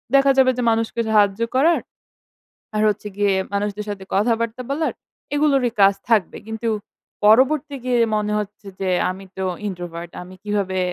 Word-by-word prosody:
দেখা 275 0 +6
যাবে 260 -1 +6
যে 250 - 0
মানুষকে 225 +1 0
সাহায্য 210 0 +3
করার, 325 +6 +4 1.0
আর 215 - +1
হচ্ছে 210 0 -3
গিয়ে 205 -1 +3 0.2
মানুষদের 205 +1 -2
সাথে 195 -2 -5
কথাবার্তা 230 +3 0
বলার 310 +3 0 0.4
এগুলোরই 275 -5 +2
কাজ 195 0 +7 0.2
থাকবে। 215 -7 +2
কিন্তু 225 +1 -3 0.6
পরবর্তী 270 +6 +4
গিয়ে 245 -1 +2 0.2
মনে 210 0 0
হচ্ছে 205 0 -7
যে 190 - 0 0.2
আমি 190 +1 -6
তো 190 - -2 0.2
ইন্ট্রোভার্ট 175 -2 -6
আমি 185 +1 -11
কিভাবে 200 -3 -1
210 Hz, 150 wpm, -21 LUFS, 195-250 Hz, 1.0 s, কাজ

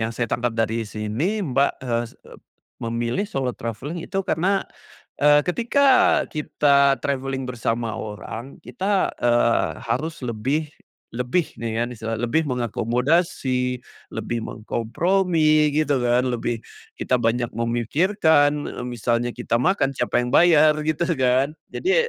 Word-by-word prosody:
yang 115 +1 -3
saya 120 - 0
tangkap 120 -1 -1
dari 115 0 0
sini 130 - -2
Mbak, 140 -2 +1
eee, 120 -1 0
s - - -18
ep - - -14 0.4
memilih 120 - -2
solo 130 -2 -2
traveling 125 +10 -5
itu 195 +3 -3
karena, 190 +5 +1 0.6
eee, 150 0 +5
ketika 235 +9 +1 0.5
kita 140 -2 +3
traveling 135 -1 -2
bersama 115 -2 -2
orang 110 +4 -7
kita, 195 0 0
eee, 120 -1 +2 0.2
harus 145 +3 -2
lebih 135 +7 -2 0.4
lebih 125 +8 -1
nih 115 0 -1
ya - - +1
misalnya, 115 -1 -4
lebih 155 +6 +1
mengakomodasi, 125 - 0 0.4
lebih 120 -1 -3
mengkompromi 155 - +1
gitu 145 -3 +2
kan, 120 +1 +3
lebih 120 -1 -2 0.3
kita 125 - +1
banyak 120 +1 0
memikirkan, 145 - +2 0.2
eee, - - -7
misalnya 120 0 -1
kita 115 - 0
makan 160 -5 +1
siapa 120 - 0
yang 125 - -3
bayar? 155 -3 +6
Gitu 155 +2 0
kan, 130 +3 +2 0.2
jadi 475 +6 +1
130 Hz, 130 wpm, -23 LUFS, 115-155 Hz, 0.6 s, bayar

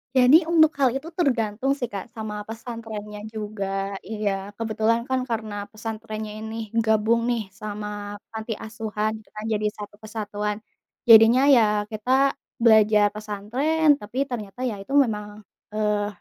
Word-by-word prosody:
Jadi, 255 +4 +8
untuk 315 -2 +6
hal 265 -2 +5
itu 305 +5 -4
tergantung 260 - 0
sih, 245 -4 -4
Kak, 200 +3 -5
sama 215 -1 -5
pesantrennya 225 -2 -7
juga, 210 -2 -4 0.4
iya. 210 -2 -1 0.3
Kebetulan 225 +1 +1
kan, 260 0 +1
karena 215 -3 -3
pesantrennya 215 -1 -6
ini 220 +1 -6 0.3
gabung 220 +2 +3
nih, 235 -2 +1 0.2
sama 210 0 -5 0.4
panti 220 0 -4
asuhan, 215 -1 -3
gitu 215 - -21
kan, 215 - -6
jadi 210 0 -1
satu 205 0 -8
kesatuan. 210 -1 -3 0.5
Jadinya 225 +3 +8
ya, 230 - +6 0.3
kita 215 +4 -3 0.5
belajar 215 -2 +6
pesantren, 260 +9 +1
tapi 210 +5 -9
ternyata, 240 -4 -7
ya 215 - -4
itu 200 +8 -7
memang, 210 -5 +1 0.3
eee, 210 -1 +1
220 Hz, 135 wpm, -24 LUFS, 210-235 Hz, 0.5 s, Jadi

